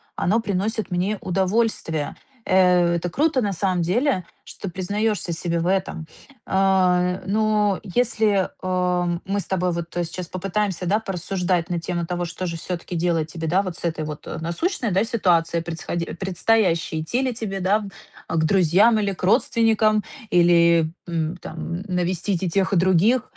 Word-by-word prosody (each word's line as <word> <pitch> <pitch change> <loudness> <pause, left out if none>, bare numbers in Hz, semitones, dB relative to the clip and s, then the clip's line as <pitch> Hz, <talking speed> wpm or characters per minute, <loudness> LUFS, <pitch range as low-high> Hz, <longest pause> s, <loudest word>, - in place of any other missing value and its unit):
Оно 210 +6 +1
приносит 210 0 -2
мне 185 +4 0
удовольствие! 190 -5 0 0.3
Э, 180 -2 +4
это 170 +1 -2
круто 290 - +1
на 205 -3 -1
самом 185 -1 0
деле, 190 - +1 0.2
что 195 - -7
признаешься 200 +1 -1
себе 170 +1 -2
в 165 - -2
этом. 185 -3 -1 0.4
Э, 185 -1 +2
но 210 -1 +1
если, 215 -2 +1
о, 180 -1 0
мы 200 +1 -1
с - - -4
тобой 180 -1 0
вот 170 -1 -3
сейчас 175 +1 -3
попытаемся, 190 0 -2
да, 200 +5 +2
порассуждать 180 -3 -2
на 175 - 0
тему 170 0 -3
того, 175 +1 -2
что 175 +2 -5
же 170 -2 -3
всё-таки 175 +1 -5
делать 165 -2 0
тебе, 165 -1 -4
да, 185 +5 +2
вот 185 -3 -5
с - - -10
этой 160 -2 -2
вот, 150 -1 -7
о, - - -5
насущной, 210 - -2
да, 190 +3 +2
ситуацией, 170 -7 +1
предсхо 165 -1 -5 0.3
предстоящей, 185 -4 +1
идти 235 +11 -1
ли 255 -2 0
тебе, 215 -4 -4
да, 200 +4 +1 0.5
к 160 -1 +1
друзьям 195 +6 +4
или 200 -2 0
к 185 - -12
родственникам? 215 +2 +3 0.3
Или, 170 -2 +4 0.2
м, 165 0 -2
там, 170 +1 -6
навестить 180 +1 -1
и 180 - 0
тех, 190 +2 +1
и - - +4
других? 190 +7 +3
185 Hz, 160 wpm, -23 LUFS, 170-205 Hz, 0.5 s, Э